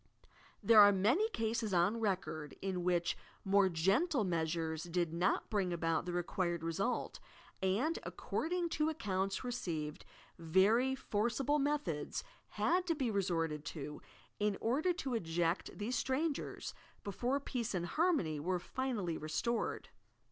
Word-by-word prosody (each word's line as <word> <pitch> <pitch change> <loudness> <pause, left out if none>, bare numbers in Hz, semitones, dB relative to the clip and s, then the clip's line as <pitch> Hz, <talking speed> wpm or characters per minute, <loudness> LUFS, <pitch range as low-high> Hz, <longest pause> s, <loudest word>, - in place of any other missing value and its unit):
There 225 -2 +7
are 205 0 +9
many 240 - +3
cases 225 - -1
on 180 +7 +3
record 180 -8 -2
in 185 -2 -2
whioh 175 -1 +2 0.3
more 195 0 +4
gentle 210 - +2
measures 165 -2 -1
did 170 -1 -1
not 175 +2 +1
bring 195 -4 +1
about 165 0 0
the - - -1
required 175 -1 -1
result, 195 +9 -1 0.4
and, 215 - +1
according 345 +1 -2
to 310 -1 +1
accounts 195 -9 -1
received, 165 -12 -3 0.4
ver>' 205 +11 +3
forcible 240 +7 0
methods 275 - -1 0.2
had 360 0 +1
to 330 - +2
be 260 -6 0
resorted 165 -6 0
to, 150 -1 -6 0.4
in 210 -1 +1
order 280 +10 +1
to 280 -7 -3
eject 170 -4 -1
these 230 +4 -1
strangers, 280 +5 -2 0.3
before 245 +7 -1
peace 240 -6 -3
and 175 -1 -1
harmony 240 - +1
were 180 +5 0
finally 210 -4 -2
restored! 160 +10 -2
195 Hz, 130 wpm, -35 LUFS, 170-250 Hz, 0.4 s, are